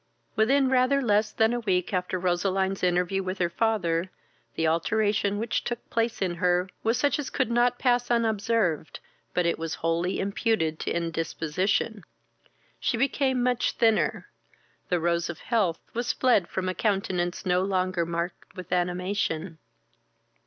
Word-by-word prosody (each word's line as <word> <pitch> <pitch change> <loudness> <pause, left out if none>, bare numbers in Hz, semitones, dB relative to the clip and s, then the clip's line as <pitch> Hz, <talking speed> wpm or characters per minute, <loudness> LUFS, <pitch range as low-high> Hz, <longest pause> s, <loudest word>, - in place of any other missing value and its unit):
Within 265 +5 +3
rather 260 +2 +3
less 215 -4 +2
than 220 +1 +2
a 240 - -1
week 190 -5 0
after 180 0 -1
Roseline's 190 +2 0
interview 180 +1 +1
with 185 0 -4
her 175 -2 0
father, 185 -5 0 0.5
the 160 - 0
alteration 205 +4 +1
which 225 +3 -1
took 240 0 -5
place 230 -3 0
in 180 -2 -1
her 180 +1 +2
was 225 +2 +1
such 285 +4 +1
as 285 - -3
could 235 - -1
not 240 +1 +3
pass 245 -1 +1
unobserved, 220 -7 0 0.4
but 180 - +2
it 170 - 0
was 165 0 -3
wholly 165 +2 -1
imputed 200 -5 0
to - - -3
indisposition. 170 +5 -1 0.8
She 235 - 0
became 265 0 +1
much 250 -1 +1
thinner; 225 -2 +1 0.6
the 180 - +2
rose 170 0 0
of 170 - -5
health 200 -8 0 0.2
was 240 +1 -1
fled 240 -9 +3
from 185 -1 -3
a 185 - 0
countenance 185 -4 -1
no 180 0 +2
longer 185 -2 0
marked 170 +2 -4
with 185 -3 -9
animation. 180 -2 -1
190 Hz, 150 wpm, -27 LUFS, 175-230 Hz, 0.8 s, Within